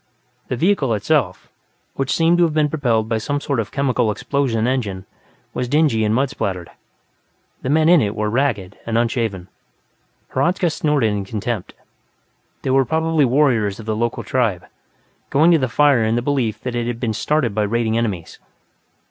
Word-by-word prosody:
The -, -, -2 dB
vehicle 140 Hz, -, +1 dB
itself, 105 Hz, -, 0 dB, 0.5 s
which 135 Hz, 0 st, -2 dB
seemed 170 Hz, +1 st, +3 dB
to 170 Hz, -1 st, +4 dB
be 155 Hz, -1 st, +2 dB
propelled 120 Hz, -8 st, 0 dB
by 115 Hz, -1 st, 0 dB
some 145 Hz, +6 st, -2 dB
sort 140 Hz, -3 st, -2 dB
of 110 Hz, -, -3 dB
chemical 130 Hz, -4 st, +1 dB
explosion 115 Hz, 0 st, -1 dB
engine, 105 Hz, -8 st, -2 dB, 0.5 s
was 125 Hz, -, -2 dB
dingy 145 Hz, -5 st, +2 dB
and 105 Hz, +1 st, +1 dB
mud 135 Hz, +2 st, +1 dB
splattered; 95 Hz, -9 st, -4 dB, 0.9 s
the 130 Hz, -, -3 dB
men 155 Hz, +2 st, +3 dB
in 170 Hz, -2 st, +6 dB
it 105 Hz, -2 st, -1 dB
were 105 Hz, 0 st, -1 dB
ragged 105 Hz, -5 st, -1 dB
and 115 Hz, 0 st, 0 dB
unshaven. 115 Hz, -6 st, -1 dB, 0.9 s
Hradzka 175 Hz, +5 st, +1 dB
snorted 145 Hz, -9 st, +1 dB
in 100 Hz, -1 st, -2 dB
contempt; 110 Hz, 0 st, -4 dB, 0.9 s
they 130 Hz, -, 0 dB
were 135 Hz, 0 st, +4 dB
probably 160 Hz, +1 st, +1 dB
warriors 120 Hz, -7 st, +2 dB
of 110 Hz, -, -9 dB
the 110 Hz, -1 st, -1 dB
local 120 Hz, +2 st, -2 dB
tribe, 110 Hz, -9 st, -1 dB, 0.6 s
going 155 Hz, +5 st, +4 dB
to 165 Hz, -, +5 dB
the 130 Hz, -2 st, -1 dB
fire 140 Hz, -2 st, +3 dB
in 110 Hz, +1 st, +1 dB
the 120 Hz, -, -1 dB
belief 125 Hz, -7 st, -1 dB
that 125 Hz, -, -4 dB
it 120 Hz, -1 st, -2 dB
had 120 Hz, -1 st, -3 dB
been 115 Hz, -3 st, -1 dB
started 140 Hz, -1 st, 0 dB
by 105 Hz, -, 0 dB
raiding 110 Hz, +1 st, 0 dB
enemies. 105 Hz, -8 st, -3 dB
120 Hz, 175 wpm, -20 LUFS, 110-145 Hz, 0.9 s, in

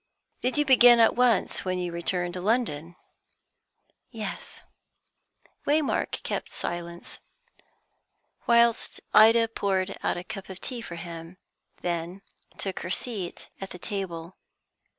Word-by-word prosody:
"Did 250 Hz, +3 st, 0 dB
you 295 Hz, -, +3 dB
begin 245 Hz, -3 st, +8 dB
at 225 Hz, -, +5 dB
once 245 Hz, -4 st, +2 dB
when 185 Hz, -1 st, -1 dB
you 180 Hz, -1 st, -2 dB
returned 175 Hz, +1 st, -1 dB
to 180 Hz, -, -4 dB
London?" 175 Hz, -7 st, 0 dB, 1.1 s
"Yes." -, -, -6 dB, 1.1 s
Waymark 295 Hz, 0 st, +1 dB
kept -, -, -3 dB
silence, 170 Hz, 0 st, -5 dB, 1.3 s
whilst 235 Hz, -1 st, +3 dB
Ida 225 Hz, +1 st, +7 dB
poured 195 Hz, -3 st, -1 dB
out -, -, 0 dB
a 175 Hz, -, -5 dB
cup 195 Hz, 0 st, -8 dB
of 190 Hz, -1 st, -8 dB
tea 245 Hz, +2 st, -5 dB
for 175 Hz, -, -7 dB
him, 170 Hz, +1 st, -8 dB, 0.4 s
and -, -, -30 dB
then 175 Hz, +2 st, -3 dB, 0.4 s
took 195 Hz, -1 st, -3 dB
her 175 Hz, -, -5 dB
seat 195 Hz, -3 st, -4 dB
at 195 Hz, -, -5 dB
the -, -, -8 dB
table. 180 Hz, -3 st, -5 dB
190 Hz, 130 wpm, -27 LUFS, 175-230 Hz, 1.3 s, begin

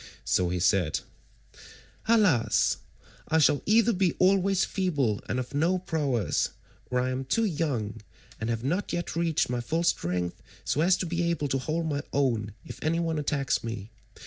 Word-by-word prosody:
So 90 Hz, -1 st, +2 dB
he 90 Hz, +1 st, -1 dB
said: 90 Hz, -2 st, +2 dB, 1.1 s
"Alas! 180 Hz, -, +3 dB, 0.5 s
I 160 Hz, -, +2 dB
shall 150 Hz, -2 st, +4 dB
either 230 Hz, +2 st, +4 dB
be 185 Hz, -2 st, +2 dB
always 195 Hz, 0 st, +3 dB
feeble 145 Hz, -, 0 dB
and 120 Hz, +6 st, 0 dB
of 125 Hz, +1 st, -5 dB
no 165 Hz, +6 st, +2 dB
prowess, 145 Hz, -, 0 dB, 0.4 s
or 125 Hz, -, +1 dB
I 130 Hz, +1 st, 0 dB
am 130 Hz, +1 st, -2 dB
too 225 Hz, +13 st, +1 dB
young, 135 Hz, -, -2 dB, 0.4 s
and 110 Hz, -, -3 dB
have 115 Hz, 0 st, -2 dB
not 180 Hz, +9 st, -1 dB
yet 175 Hz, -1 st, -3 dB
reached 165 Hz, -2 st, +1 dB
my 120 Hz, -1 st, -1 dB
full 165 Hz, +8 st, -1 dB
strength 90 Hz, -, -1 dB, 0.2 s
so 150 Hz, -, +1 dB
as 180 Hz, +3 st, +4 dB
to -, -, -2 dB
be 170 Hz, 0 st, 0 dB
able 150 Hz, -4 st, -1 dB
to 135 Hz, -, +1 dB
hold 160 Hz, +5 st, -2 dB
my 145 Hz, -2 st, -1 dB
own 115 Hz, -7 st, 0 dB
if -, -, -9 dB
any 165 Hz, +2 st, +1 dB
one 165 Hz, -2 st, -1 dB
attacks 140 Hz, -2 st, 0 dB
me. 115 Hz, -2 st, -6 dB
145 Hz, 170 wpm, -28 LUFS, 115-170 Hz, 1.1 s, shall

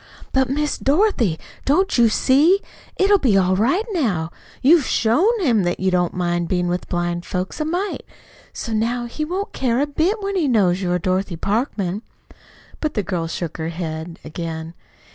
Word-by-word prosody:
"But, 265 Hz, -1 st, +2 dB
Miss 295 Hz, +2 st, -1 dB
Dorothy, 275 Hz, -, +2 dB, 0.3 s
don't 370 Hz, +8 st, +2 dB
you 235 Hz, -2 st, +5 dB
see? 290 Hz, -, +4 dB, 0.4 s
It'll 395 Hz, +1 st, +4 dB
be 230 Hz, -, +3 dB
all 185 Hz, -1 st, +3 dB
right, 270 Hz, -, +2 dB
now. 195 Hz, -, 0 dB, 0.3 s
You've 300 Hz, +1 st, +5 dB
SHOWN 365 Hz, -, +2 dB
him 230 Hz, -6 st, +3 dB
that 175 Hz, -1 st, -1 dB
you 190 Hz, 0 st, +1 dB
don't 180 Hz, -1 st, +1 dB
mind 175 Hz, -1 st, 0 dB
being 180 Hz, -1 st, 0 dB
with 180 Hz, +1 st, -3 dB
blind 175 Hz, -1 st, -1 dB
folks 185 Hz, -, -4 dB
a -, -, 0 dB
mite. 360 Hz, +5 st, -2 dB, 0.5 s
So 230 Hz, -, -5 dB
now 235 Hz, +3 st, 0 dB
he 240 Hz, +6 st, -4 dB
won't 375 Hz, +7 st, -3 dB
care 245 Hz, -2 st, 0 dB
a 285 Hz, -, +2 dB
bit 320 Hz, +9 st, 0 dB
when 395 Hz, 0 st, -2 dB
he 340 Hz, -6 st, +1 dB
knows 195 Hz, -7 st, +2 dB
you 180 Hz, -2 st, -1 dB
are 180 Hz, -, +2 dB
Dorothy 185 Hz, +1 st, -1 dB
Parkman." 200 Hz, -, -1 dB, 0.8 s
But 305 Hz, -1 st, -2 dB
the 210 Hz, -, 0 dB
girl 175 Hz, -4 st, -2 dB
shook 165 Hz, -1 st, -4 dB
her 160 Hz, 0 st, -3 dB
head 165 Hz, 0 st, -5 dB
again. 160 Hz, 0 st, -5 dB
220 Hz, 180 wpm, -21 LUFS, -, 0.8 s, you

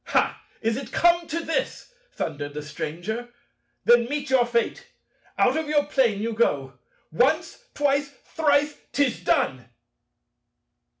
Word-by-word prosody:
"Ha! -, -, +1 dB, 0.2 s
Is 225 Hz, +1 st, +1 dB
it 270 Hz, -3 st, -7 dB
come 345 Hz, -1 st, +3 dB
to 335 Hz, +2 st, -2 dB
this?" 330 Hz, +9 st, -3 dB, 0.2 s
thundered 145 Hz, -2 st, -4 dB
the 150 Hz, -, -4 dB
Stranger: 175 Hz, +11 st, -5 dB, 0.6 s
"then 240 Hz, 0 st, +6 dB
meet 285 Hz, +2 st, -3 dB
your 250 Hz, -2 st, +4 dB
fate: 235 Hz, -1 st, -1 dB, 0.5 s
out -, -, +3 dB
of 320 Hz, -1 st, -1 dB
your 295 Hz, -1 st, +3 dB
Plane 235 Hz, -8 st, +1 dB
you 230 Hz, 0 st, -1 dB
go. 135 Hz, -, 0 dB, 0.3 s
Once, 315 Hz, -, +1 dB
twice, 285 Hz, 0 st, +1 dB, 0.2 s
thrice! 295 Hz, -1 st, +2 dB, 0.2 s
'Tis 285 Hz, -3 st, +1 dB
done!" -, -, 0 dB
260 Hz, 130 wpm, -25 LUFS, 220-295 Hz, 0.6 s, then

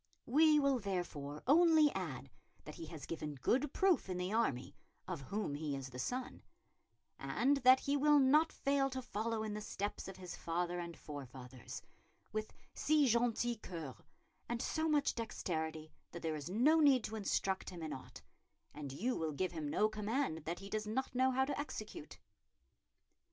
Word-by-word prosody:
"We 305 Hz, +4 st, +5 dB
will 275 Hz, -3 st, +3 dB
therefore 170 Hz, -8 st, -4 dB
only 315 Hz, +1 st, +6 dB
add 140 Hz, -8 st, -5 dB, 0.3 s
that 150 Hz, -, -8 dB
he 165 Hz, -, -8 dB
has 160 Hz, -2 st, -8 dB
given 150 Hz, -3 st, -4 dB
good 260 Hz, -, +1 dB
proof 375 Hz, -, +2 dB
in 180 Hz, -, -2 dB
the 180 Hz, +3 st, -2 dB
army 140 Hz, -, 0 dB, 0.3 s
of 180 Hz, -6 st, -4 dB
whom 200 Hz, +3 st, -3 dB
he 145 Hz, -1 st, -2 dB
is 135 Hz, -1 st, -6 dB
the 125 Hz, -, -7 dB
son; 250 Hz, -, -3 dB, 0.8 s
and 275 Hz, +4 st, +2 dB
that 255 Hz, 0 st, +6 dB
he 280 Hz, -, 0 dB
will 295 Hz, +1 st, +5 dB
not 290 Hz, +4 st, +5 dB
fail 275 Hz, -1 st, +1 dB
to 260 Hz, 0 st, -4 dB
follow 220 Hz, 0 st, -2 dB
in 215 Hz, -1 st, -3 dB
the 210 Hz, -, -4 dB
steps 205 Hz, -1 st, -4 dB
of 190 Hz, -, -7 dB
his 180 Hz, -1 st, -7 dB
father 175 Hz, +1 st, -2 dB
and 170 Hz, -1 st, -6 dB
forefathers, 130 Hz, -3 st, -8 dB, 0.5 s
with 215 Hz, 0 st, -3 dB, 0.2 s
si 305 Hz, -1 st, +3 dB
gentil 235 Hz, 0 st, +2 dB
cœur 155 Hz, -, -7 dB, 0.5 s
and 240 Hz, 0 st, -1 dB
so 315 Hz, +5 st, 0 dB
much 295 Hz, -2 st, +3 dB
dexterity 160 Hz, -8 st, -3 dB, 0.2 s
that 170 Hz, -, -7 dB
there 160 Hz, -1 st, -1 dB
is 150 Hz, +2 st, -5 dB
no 265 Hz, -, +4 dB
need 275 Hz, -6 st, +5 dB
to 220 Hz, -, -4 dB
instruct 195 Hz, -2 st, -1 dB
him 175 Hz, -3 st, -8 dB
in 155 Hz, -, -3 dB
aught, 130 Hz, -, -10 dB, 0.5 s
and 145 Hz, -2 st, -6 dB
you 230 Hz, -, -1 dB
will 160 Hz, -2 st, -2 dB
give 185 Hz, +5 st, -1 dB
him 155 Hz, -4 st, -4 dB
no 210 Hz, +8 st, +3 dB
command 215 Hz, -, -2 dB
that 170 Hz, +2 st, -2 dB
he 195 Hz, +1 st, -9 dB
does 215 Hz, 0 st, -2 dB
not 255 Hz, +5 st, -2 dB
know 260 Hz, +1 st, +3 dB
how 265 Hz, +1 st, +2 dB
to 285 Hz, -, -2 dB
execute." 295 Hz, +2 st, -6 dB
210 Hz, 180 wpm, -36 LUFS, 160-260 Hz, 0.8 s, only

